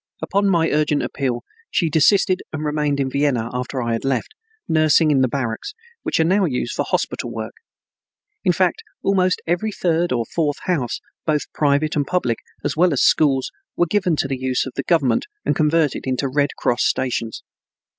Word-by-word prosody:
Upon 200 Hz, 0 st, +1 dB
my 165 Hz, -3 st, +2 dB
urgent 150 Hz, -1 st, +1 dB
appeal 125 Hz, -4 st, -2 dB, 0.3 s
she 170 Hz, -, +1 dB
desisted 185 Hz, +5 st, +3 dB
and 155 Hz, -1 st, -4 dB
remained 150 Hz, -1 st, 0 dB
in 135 Hz, -, +1 dB
Vienna 130 Hz, -5 st, 0 dB
after 125 Hz, +1 st, -3 dB
I 115 Hz, 0 st, -1 dB
had 115 Hz, -, -2 dB
left, 135 Hz, -1 st, -1 dB, 0.4 s
nursing 155 Hz, 0 st, +4 dB
in 135 Hz, -2 st, +3 dB
the 130 Hz, -, +4 dB
barracks, 130 Hz, -, -3 dB, 0.3 s
which -, -, -1 dB
are -, -, +5 dB
now 190 Hz, +4 st, +3 dB
used 130 Hz, -7 st, -2 dB
for -, -, -1 dB
hospital -, -, -2 dB
work. -, -, -5 dB, 0.9 s
In -, -, +4 dB
fact, 450 Hz, -, +1 dB, 0.2 s
almost 185 Hz, -2 st, +2 dB
every 175 Hz, +6 st, 0 dB
third 175 Hz, -2 st, 0 dB
or 120 Hz, -2 st, 0 dB
fourth 150 Hz, +2 st, -1 dB
house, 145 Hz, -10 st, -1 dB, 0.3 s
both 150 Hz, -2 st, 0 dB
private 150 Hz, +1 st, +1 dB
and 145 Hz, -2 st, 0 dB
public, 125 Hz, -11 st, 0 dB, 0.3 s
as -, -, 0 dB
well 175 Hz, +1 st, +3 dB
as 135 Hz, -, +1 dB
schools, 135 Hz, -4 st, +3 dB, 0.3 s
were 175 Hz, -, +4 dB
given 180 Hz, -1 st, +1 dB
to 145 Hz, -, -1 dB
the 135 Hz, -1 st, -3 dB
use 130 Hz, 0 st, 0 dB
of 130 Hz, -, -7 dB
the -, -, -1 dB
government 150 Hz, -, +1 dB, 0.2 s
and -, -, +1 dB
converted 155 Hz, -3 st, +1 dB
into 130 Hz, +1 st, 0 dB
Red 140 Hz, +2 st, +1 dB
Cross 120 Hz, +1 st, +1 dB
stations. 120 Hz, -3 st, -1 dB
150 Hz, 185 wpm, -21 LUFS, 130-170 Hz, 0.9 s, are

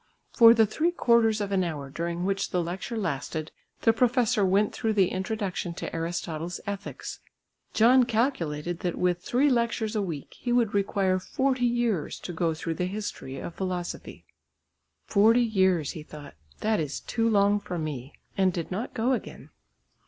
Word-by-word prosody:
For 230 Hz, -1 st, +8 dB
the 225 Hz, -1 st, +5 dB
three 310 Hz, +11 st, 0 dB
quarters 235 Hz, -9 st, +3 dB
of 200 Hz, -1 st, -3 dB
an 190 Hz, -2 st, +2 dB
hour 145 Hz, -5 st, -4 dB
during 170 Hz, +3 st, -3 dB
which 195 Hz, 0 st, -1 dB
the 180 Hz, -1 st, 0 dB
lecture 185 Hz, +7 st, -4 dB
lasted 155 Hz, -4 st, -3 dB, 0.3 s
the 225 Hz, -, +4 dB
professor 245 Hz, -2 st, +2 dB
went 195 Hz, +2 st, +2 dB
through 220 Hz, -1 st, -1 dB
the 195 Hz, -4 st, +3 dB
introduction 190 Hz, -3 st, -3 dB
to -, -, -5 dB
Aristotle's 165 Hz, 0 st, -3 dB
Ethics. 200 Hz, -1 st, -6 dB, 0.6 s
John 245 Hz, +3 st, +6 dB
calculated 175 Hz, -, -1 dB
that 175 Hz, -2 st, -2 dB
with 180 Hz, -1 st, +1 dB
three 255 Hz, +9 st, +2 dB
lectures 235 Hz, -3 st, 0 dB
a 210 Hz, -, +1 dB
week 165 Hz, -8 st, -5 dB
he 245 Hz, -, -3 dB
would 240 Hz, -3 st, +2 dB
require 195 Hz, -2 st, +1 dB
forty 260 Hz, +4 st, 0 dB
years 235 Hz, -9 st, -1 dB
to 175 Hz, -, -6 dB
go 165 Hz, -1 st, 0 dB
through 165 Hz, +1 st, -3 dB
the 180 Hz, -, +1 dB
history 190 Hz, -9 st, -5 dB
of 170 Hz, -, -6 dB
philosophy. 180 Hz, -2 st, -5 dB, 0.8 s
"Forty 225 Hz, +4 st, +4 dB
years," 190 Hz, -, +2 dB
he 160 Hz, -, -7 dB
thought, 150 Hz, -1 st, -11 dB, 0.3 s
"that 215 Hz, 0 st, +1 dB
is 150 Hz, -2 st, -3 dB
too 230 Hz, -1 st, 0 dB
long 205 Hz, -1 st, +3 dB
for 180 Hz, -3 st, -5 dB
me." 145 Hz, -4 st, -5 dB, 0.2 s
And 190 Hz, -1 st, +3 dB
did 170 Hz, -1 st, -5 dB
not 215 Hz, +7 st, -4 dB
go 240 Hz, +4 st, +1 dB
again. 250 Hz, -, -6 dB
195 Hz, 165 wpm, -27 LUFS, 170-225 Hz, 0.8 s, For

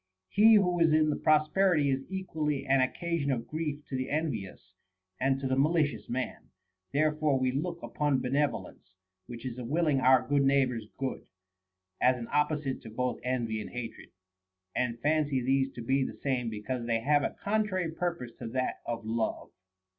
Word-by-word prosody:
He 220 Hz, +2 st, +6 dB
who 180 Hz, -4 st, +3 dB
is 165 Hz, -1 st, +4 dB
in 155 Hz, -1 st, +2 dB
prosperity 155 Hz, 0 st, +3 dB
is 135 Hz, 0 st, -2 dB
equally 160 Hz, -7 st, -2 dB
an 135 Hz, 0 st, +3 dB
occasion 165 Hz, +2 st, -1 dB
of 120 Hz, -3 st, -2 dB
grief 150 Hz, -2 st, -4 dB
to 135 Hz, -, -5 dB
the 130 Hz, 0 st, -2 dB
envious 115 Hz, -, -3 dB, 0.5 s
and 135 Hz, +1 st, +1 dB
to 135 Hz, -, -5 dB
the 130 Hz, -, +1 dB
mali 155 Hz, +4 st, +3 dB
cious 115 Hz, -7 st, -7 dB
man; 125 Hz, 0 st, -4 dB, 0.4 s
therefore 150 Hz, -1 st, +2 dB
we 130 Hz, -1 st, +1 dB
look 170 Hz, +5 st, -3 dB
upon 145 Hz, -3 st, 0 dB
benevolence, 125 Hz, -9 st, -2 dB, 0.3 s
which 120 Hz, 0 st, -8 dB
is 125 Hz, -1 st, -5 dB
a -, -, -5 dB
willing 150 Hz, +2 st, +1 dB
our 130 Hz, -1 st, +4 dB
neighbor's 135 Hz, -5 st, +2 dB
good, 135 Hz, -1 st, -4 dB, 0.7 s
as 125 Hz, 0 st, +4 dB
an 115 Hz, -1 st, -6 dB
opposite 150 Hz, -2 st, 0 dB
to 110 Hz, -, -10 dB
both 125 Hz, +2 st, -2 dB
envy 120 Hz, -4 st, -1 dB
and -, -, -7 dB
hatred, 120 Hz, -2 st, -7 dB, 0.7 s
and 120 Hz, -2 st, -1 dB
fancy 150 Hz, -2 st, +2 dB
these 135 Hz, +2 st, +1 dB
two 120 Hz, -, -8 dB
to 115 Hz, -, -10 dB
be 135 Hz, 0 st, +3 dB
the -, -, -5 dB
same 125 Hz, -4 st, 0 dB
because 115 Hz, +3 st, -4 dB
they 115 Hz, -1 st, +1 dB
have 145 Hz, +4 st, +3 dB
a -, -, -2 dB
contrary 200 Hz, -5 st, 0 dB
purpose 170 Hz, -7 st, -3 dB
to -, -, -5 dB
that 130 Hz, +2 st, -2 dB
of 115 Hz, -2 st, -3 dB
love. 115 Hz, 0 st, -2 dB
135 Hz, 175 wpm, -30 LUFS, 125-155 Hz, 0.7 s, He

